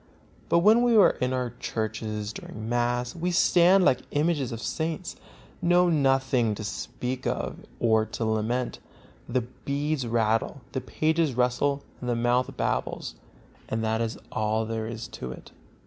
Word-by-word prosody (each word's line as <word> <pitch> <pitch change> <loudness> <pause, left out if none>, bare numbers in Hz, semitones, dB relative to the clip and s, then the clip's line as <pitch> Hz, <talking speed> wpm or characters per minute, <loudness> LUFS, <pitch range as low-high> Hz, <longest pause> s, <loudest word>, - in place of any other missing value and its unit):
But 170 - +4
when 220 +3 +7
we 240 -1 +4
are 205 - +7
in 125 0 +1
our 125 -2 -1
churches 110 -1 -3
during 110 +1 -8
mass, 120 +1 0
we 175 +1 -1
stand 180 +2 +5
like 125 -8 +4
images 145 -3 0
of 115 - -5
saints; 160 +10 -3 0.5
know 175 0 +4
nothing 135 -6 +2
to 110 - -6
speak 125 +4 -4
of - - -2 0.2
or 110 -2 +3
to 115 - -3
lament; 110 +3 -1 0.5
the 125 +1 +1
beads 140 +3 -3
rattle, 115 +4 +1
the 130 - -2
pages 155 +1 0
rustle 125 +3 +1 0.2
and 125 - -4
the 120 - +1
mouth 120 +2 +1
babbles; - - -2 0.6
and 110 0 -1
that 110 +1 0
is 115 0 -2
all 110 +1 0
there 110 0 -3
is 115 0 -6
to 65 - -6
it. - - -11
125 Hz, 155 wpm, -27 LUFS, 110-145 Hz, 0.6 s, when